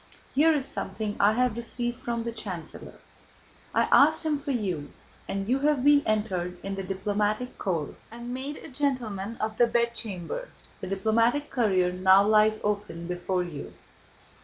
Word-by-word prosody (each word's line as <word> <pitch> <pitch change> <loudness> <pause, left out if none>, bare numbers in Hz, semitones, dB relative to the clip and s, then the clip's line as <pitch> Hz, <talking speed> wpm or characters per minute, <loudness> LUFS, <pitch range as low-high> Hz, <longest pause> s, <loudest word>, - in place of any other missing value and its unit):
Here 310 +4 +5
is 290 -4 0
something 210 -1 -4
I 205 +2 +5
have 250 -1 +1
received 240 +1 -3
from 235 -1 -2
the 235 - -3
chancellor. 190 -8 -7 0.8
I - - +3
asked 315 +3 +5
him 300 -2 +1
for 285 +1 -7
you, 185 - -2 0.4
and 195 0 -3
you 260 +3 +2
have 290 -2 +2
been 290 0 +6
entered 185 -5 -1
in 195 - -3
the 195 - -3
diplomatic 205 +5 -2
corps 165 -7 -2 0.2
and 235 +2 -7
made 275 +3 -4
a - - -10
Gentleman 235 -7 -2
of 215 0 -2
the 240 - +5
Bedchamber. 235 - -1 0.3
The 190 - -6
diplomatic 230 +9 +1
career 190 -7 +2
now 190 +2 +5
lies 215 0 +4
open 205 -5 -2
before 180 +1 -1
you." 165 -5 -8
215 Hz, 160 wpm, -27 LUFS, 190-250 Hz, 0.8 s, been